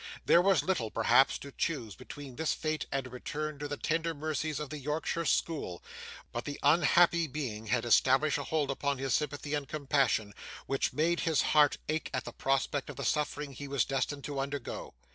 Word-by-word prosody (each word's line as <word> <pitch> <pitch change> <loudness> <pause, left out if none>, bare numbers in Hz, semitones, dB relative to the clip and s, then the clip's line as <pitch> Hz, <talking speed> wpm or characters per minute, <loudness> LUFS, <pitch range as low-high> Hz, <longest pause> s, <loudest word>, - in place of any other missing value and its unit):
There 170 - +6
was 195 +1 +3
little, 155 -13 0
perhaps, 120 +5 +4
to 140 - -10
choose 130 - -2
between 140 - -10
this 160 +2 0
fate 155 -1 -2
and 135 -1 -1
a - - -8
return 150 +3 -4
to 145 - -3
the 145 0 -4
tender 165 +2 -1
mercies 155 0 -2
of 150 -1 -5
the 150 - -5
Yorkshire 155 +4 -2
school; 145 - -1 0.5
but 120 - -3
the 145 -1 -6
unhappy 170 +2 +5
being 125 -7 -5
had 120 0 +1
established 135 +5 +4
a - - -3
hold 150 -3 0
upon 140 0 -1
his 135 0 -1
sympathy 145 0 -1
and 145 -2 -1
compassion, 135 -8 +1 0.3
which 135 0 0
made 170 +3 +1
his 160 -3 +2
heart 150 -1 +5
ache 155 +1 -1
at 130 - -2
the - - -7
prospect 135 +1 0
of 145 - -6
the 140 - -4
suffering 150 -1 -1
he 140 +2 -7
was 140 -3 +1
destined 135 +1 -2
to 145 -2 -4
undergo. 140 -1 -4
145 Hz, 195 wpm, -31 LUFS, 135-155 Hz, 0.5 s, There